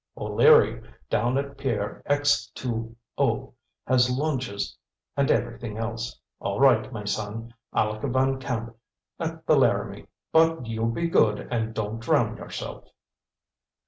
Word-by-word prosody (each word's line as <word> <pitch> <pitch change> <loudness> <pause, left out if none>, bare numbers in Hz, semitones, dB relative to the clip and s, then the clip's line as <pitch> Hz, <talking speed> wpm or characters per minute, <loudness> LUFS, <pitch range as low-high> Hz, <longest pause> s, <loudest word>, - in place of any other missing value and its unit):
"O'Leary, 460 0 +5 0.3
down 120 +3 +2
at 140 0 -4
pier 115 -7 -2
X 145 -4 +2
2 115 -2 -4 0.2
O - - 0 0.3
has 125 -1 +4
launches 130 -7 -2 0.4
and 140 -1 +2
everything 115 -1 -1
else. 115 0 -4 0.2
All - - -2
right, 130 -4 +5
my 110 -4 -5
son, 110 +3 -3 0.2
Aleck 110 0 0
Van 130 +1 +2
Camp, 115 -3 -4 0.4
at - - -4
the - - +5
Laramie. - - +1 0.2
But 165 -4 +4
you 115 0 -1
be 170 +9 0
good 105 -10 +2
and 110 -2 -1
don't 110 +1 -3
drown 115 - +1
yourself." - - -7
115 Hz, 130 wpm, -26 LUFS, 110-135 Hz, 0.4 s, O'Leary